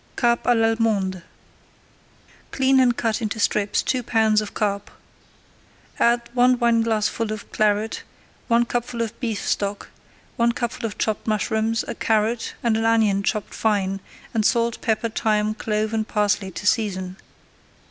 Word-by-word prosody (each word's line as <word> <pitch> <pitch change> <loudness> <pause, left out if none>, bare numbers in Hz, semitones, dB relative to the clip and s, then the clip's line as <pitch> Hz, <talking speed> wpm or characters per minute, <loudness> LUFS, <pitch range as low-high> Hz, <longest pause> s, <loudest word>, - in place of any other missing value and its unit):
CARP 235 -1 +1
À 245 - +4
L'ALLEMANDE 225 -5 +1 1.3
Clean 265 0 +3
and 245 -2 +3
cut 225 +1 0
into 220 0 -3
strips 205 -2 +1
two 255 - 0
pounds 220 -2 +2
of 210 - -5
[Page - - -10
84] - - +5
carp. 200 0 -5 1.1
Add 235 0 +4
one 250 0 +4
wineglassful 230 -2 +1
of 215 -1 -7
Claret, 215 +1 0 0.5
one 235 -1 +3
cupful 240 0 -2
of 225 - -7
beef 225 -4 -3
stock, 200 0 -2 0.5
one 235 0 +3
cupful 235 -1 -3
of 210 - -9
chopped 215 0 -2
mushrooms, 220 +1 0
a - - -3
carrot 220 +1 0
and 230 -2 +2
an 225 - -1
onion 220 -3 +3
chopped 210 +1 -2
fine, 195 -3 0 0.3
and 220 -2 +1
salt, 235 +1 +1
pepper, 225 0 0
thyme, 215 -1 0
clove 215 0 -2
and 220 -1 -1
parsley 205 -2 0
to 190 - -8
season. 190 -4 0
220 Hz, 150 wpm, -23 LUFS, 210-235 Hz, 1.3 s, 84